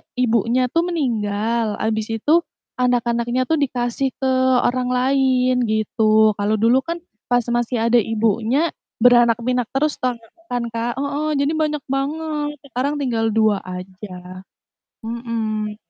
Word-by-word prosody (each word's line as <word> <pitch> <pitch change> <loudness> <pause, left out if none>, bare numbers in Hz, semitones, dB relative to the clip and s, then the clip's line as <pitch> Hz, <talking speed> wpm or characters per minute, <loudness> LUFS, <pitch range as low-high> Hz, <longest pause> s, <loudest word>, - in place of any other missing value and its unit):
ibunya 245 +1 +2
tuh 335 +1 +2
meninggal. 225 -7 -1
Habis 220 0 -1
itu 320 +3 +4 0.4
anak-anaknya 240 0 +1
tuh 320 - +3
dikasih 255 0 -1
ke 265 - +1 0.3
orang 250 0 0
lain 255 0 +2
gitu. 215 0 +3
Kalau 205 +2 +1
dulu 235 +3 +5
kan 335 0 -4 0.3
pas 245 -1 +2
masih 240 0 0
ada 240 - +5
ibunya, 225 +7 +1 0.3
beranak 240 -1 +5
pinak 250 -1 0
terus 295 +2 +1
toh 250 -1 0 0.3
kan, 245 -1 -2
Kak. 230 +1 -2
Heeh, 285 +3 -2
jadi 285 +2 +1
banyak 300 -2 -1
banget. 295 +2 -2
Sekarang 280 +2 -2
tinggal 225 -4 0
2 215 -2 +3
aja, 185 0 -9 0.6
mhm. 225 -2 -3
240 Hz, 130 wpm, -20 LUFS, 220-270 Hz, 0.6 s, dulu